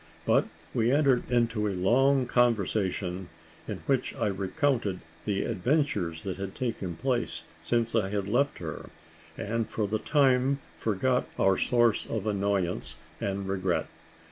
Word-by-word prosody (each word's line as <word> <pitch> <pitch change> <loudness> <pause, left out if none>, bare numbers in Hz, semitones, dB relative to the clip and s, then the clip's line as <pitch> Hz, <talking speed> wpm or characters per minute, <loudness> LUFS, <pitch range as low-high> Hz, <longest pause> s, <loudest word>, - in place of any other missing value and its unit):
But - - +3 0.3
we 115 +1 +2
entered 135 -3 +3
into 115 -3 +1
a 95 -3 -2
long 130 +8 +4
conversation, 100 -6 +1 0.4
in - - -5
which - - 0
I - - 0
recounted 100 +1 0 0.2
the 100 -2 0
adventures 110 - 0
that 95 -2 -4
had 95 0 -5
taken 100 -8 -3
place 125 +3 -1 0.2
since 115 -1 0
I 105 -4 +2
had 100 -1 -2
left 135 +7 +1
her, 80 -3 -6 0.5
and 115 +1 -2
for 110 -2 -1
the 110 +2 -1
time 135 -1 +3 0.2
forgot 125 +4 0
our 95 0 +4
source 120 +1 +2
of 110 -3 -3
annoyance 100 -3 -1 0.2
and 100 0 -2
regret. 95 -2 0
110 Hz, 140 wpm, -28 LUFS, 95-125 Hz, 0.5 s, long